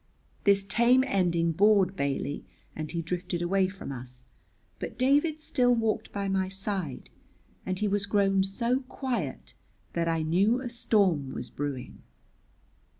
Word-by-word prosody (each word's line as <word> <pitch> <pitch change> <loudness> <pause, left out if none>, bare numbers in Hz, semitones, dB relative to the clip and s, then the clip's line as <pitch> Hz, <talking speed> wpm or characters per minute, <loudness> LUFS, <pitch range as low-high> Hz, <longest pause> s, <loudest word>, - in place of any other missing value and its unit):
This 200 -1 +4
tame 235 +5 +4
ending 175 -8 +1
bored 195 +1 +4
Bailey, 140 -1 -2 0.3
and 155 -1 -4
he 170 -1 -3
drifted 175 +1 -3
away 190 +2 +2
from 190 -5 -7
us, 125 -1 -4 0.5
but - - -6
David 290 +5 +3
still 245 -5 +2
walked 220 -1 -1
by 200 -1 -2
my 190 -1 0
side, 195 -7 -4 0.6
and 185 0 -1
he 210 +2 0
was 200 0 0
grown 195 -2 +3
so 235 +6 0
quiet 230 - -4 0.4
that 170 -1 0
I 165 -1 +1
knew 195 +10 +3
a 255 -2 -5
storm 190 - +1
was 120 - -6
brewing. 140 -3 -5
195 Hz, 145 wpm, -28 LUFS, 165-220 Hz, 0.6 s, This